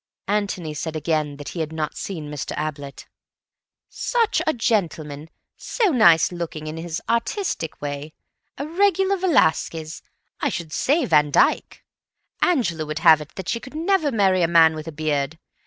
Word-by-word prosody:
Antony 195 -6 -1
said 160 +2 -5
again 155 -2 -1
that 145 -2 -7
he 175 - -7
had 160 -1 -2
not 155 -2 -3
seen 155 -6 -6
Mr. 150 0 -5
Ablett. 145 -2 -5 0.8
"Such 465 -2 0
a - - +5
gentleman. 160 -9 -1 0.3
So 450 -5 0
nice 175 - +5
looking, 170 -3 -5
in 155 +1 -6
his 165 0 -5
artistic 235 - -2
way. 145 +1 -5 0.4
A 280 - -4
regular 385 +3 +2
Velasquez—I 160 - -1
should 160 -2 -5
say 290 +2 +2
Van 150 -5 +3
Dyck. - - +1 0.6
Angela 230 - +1
would 155 +1 -4
have 160 -2 +8
it 150 - -11
that 190 -3 -7
she 235 - -1
could 260 +4 -12
never 325 -2 +1
marry 190 -5 +2
a 170 - +3
man 165 -1 +6
with 155 0 -7
a - - -4
beard. 150 -1 -2
165 Hz, 155 wpm, -22 LUFS, 155-235 Hz, 0.8 s, have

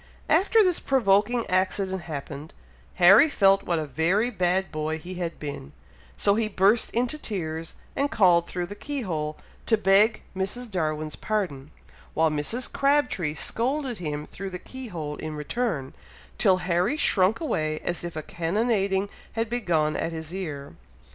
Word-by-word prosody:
After 395 +7 +5
this 360 -3 +1
provoking 235 -1 +2
accident 190 0 0
happened, 150 -1 -7 0.4
Harry 200 - +7
felt 195 -6 +4
what 170 - -1
a 155 - -2
very 180 - +1
bad 185 -2 0
boy 155 0 -2
he 175 +4 -8
had 170 -1 -3
been, 140 - -7 0.4
so 200 - +3
he 220 +1 +1
burst 205 +2 +3
into 250 +6 -1
tears, 165 - -4 0.2
and 285 +1 +1
called 175 -7 +4
through 180 -1 -3
the 200 - -8
key 280 +7 -5
hole 155 -7 -3 0.3
to 225 - +4
beg 210 +2 +4
Mrs. 210 +5 -2
Darwin's 155 -4 -2
pardon, 175 -11 -3 0.5
while 160 0 +3
Mrs. 155 +12 0
Crabtree 275 - +1
scolded 250 - -1
him 150 -3 -4
through 195 +4 -7
the 180 - -5
key 260 +7 -9
hole 155 -7 -5
in 155 -1 -5
return, 150 - -2 0.5
till 185 - +4
Harry 180 - +1
shrunk 195 -6 +3
away 155 - -1
as 175 0 -3
if 175 -2 -6
a 155 - -4
cannonading 195 +2 0 0.3
had 225 0 -2
begun 165 -10 +1
at 165 - -2
his 160 0 -6
ear. 150 -7 -5
185 Hz, 155 wpm, -26 LUFS, 160-225 Hz, 0.5 s, Harry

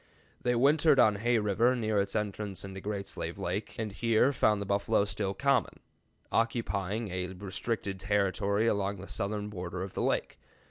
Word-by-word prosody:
They 125 0 +1
wintered 145 +4 +4
on 105 -4 +5
Hay 120 +3 +2
River 110 +4 +2
near 110 -3 0
its 100 0 -3
entrance 105 -2 -3
into 95 0 -7
Great 100 -1 -4
Slave - - -4
Lake, 95 +5 -3
and 110 -2 -3
here 115 +5 +2
found 105 -4 +3
the 100 - -3
buffalo 100 +1 +2
still 100 -1 -2
common, 140 0 +1 0.5
occupying 110 -2 0
a 90 0 -2
restricted 95 +1 -4
territory 100 +1 +1
along 100 -2 0
the 95 +1 -9
southern 105 +1 -3
border 90 -2 -5
of 95 - -7
the - - -2
lake. - - -1
105 Hz, 170 wpm, -30 LUFS, 100-115 Hz, 0.5 s, on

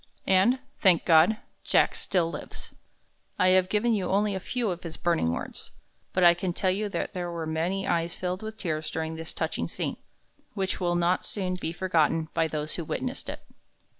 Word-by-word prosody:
And, 195 +7 +4 0.2
thank 185 -5 +5
God, 165 +6 +6 0.3
Jack - - +3
still 170 -3 0
lives." - - -8 0.6
I 185 - +4
have 185 0 +4
given 215 +3 +2
you 195 -4 0
only 205 +1 +2
a 190 - -2
few 230 +2 -1
of 175 0 -5
his 165 -2 -6
burning 170 - +1
words, 85 - -5 0.4
but 185 - +1
I 175 0 +9
can 175 +1 -3
tell 185 +1 +1
you 205 +2 -1
there 180 -2 -3
were 170 -1 -4
many 165 +5 -1
eyes 170 0 0
filled 180 0 -3
with 220 0 -7
tears 155 -6 -3
during 160 0 -3
this 160 0 -6
touching - - -2
scene, - - -3 0.6
which 190 -2 -1
will 175 -2 +1
not 175 +1 +2
soon 185 -3 -1
be 180 -3 -3
forgotten 165 -3 +1
by 165 -1 +2
those 155 -1 -3
who 170 - -2
witnessed - - -4
it. - - -7
180 Hz, 190 wpm, -27 LUFS, 165-190 Hz, 0.6 s, I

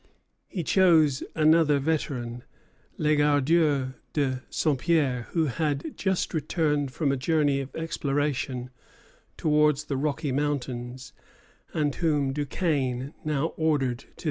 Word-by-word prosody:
He 180 - -4
chose 160 -6 +4
another 155 -1 +4
veteran, 130 -5 -2 0.5
Legardeur 145 -2 +2 0.2
de 130 -4 0
Saint 150 -5 0
Pierre, 140 -8 +1
who 165 -2 +2
had 145 0 -2
just 190 -2 -1
returned 150 -2 0
from 140 +1 0
a - - +1
journey 145 0 +1
of 135 0 -7
exploration 140 -5 -2 0.7
towards 150 -1 +3
the 140 -3 -3
Rocky 150 +1 -1
Mountains, 130 -3 -3 0.6
and 150 -2 0
whom 145 -5 0
Duquesne 140 -3 -1
now 150 +1 -1
ordered 140 -6 +1
to - - -16
the - - -28
Ohio. - - -24
145 Hz, 120 wpm, -26 LUFS, 135-155 Hz, 0.7 s, chose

